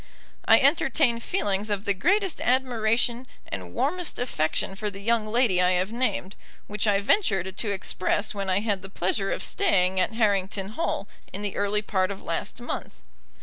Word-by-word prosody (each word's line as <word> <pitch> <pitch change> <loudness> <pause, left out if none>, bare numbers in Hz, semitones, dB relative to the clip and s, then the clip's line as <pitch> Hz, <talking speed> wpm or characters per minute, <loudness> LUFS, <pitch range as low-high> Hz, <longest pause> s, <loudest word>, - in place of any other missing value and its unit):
I - - +7
entertain 270 -3 +3
feelings 210 - -1
of 205 0 -2
the 200 - +3
greatest 375 - +1
admiration 245 -1 +1 0.2
and 90 -3 -6
warmest 330 - -1
affection 190 -6 -1
for 210 +2 -3
the 195 -1 -10
young 220 +1 +1
lady 215 -5 +2
I 180 0 +4
have 185 +3 0
named, 230 -5 -1 0.3
which 210 +1 -2
I 200 -1 +4
ventured 195 - +1
to 220 - -1
express 200 +2 -1
when 200 -2 -3
I 190 +2 +2
had 205 -3 -1
the 195 - -9
pleasure 195 +1 -1
of - - -1
staying 185 -1 +2
at 185 +4 +1
Harrington 200 -3 0
Hall 240 +10 -2 0.2
in 205 - -6
the 205 - -3
early 205 +1 +1
part 190 -3 0
of 200 -1 -7
last 165 +7 -4
month. 240 - -5
205 Hz, 175 wpm, -26 LUFS, 190-240 Hz, 0.3 s, I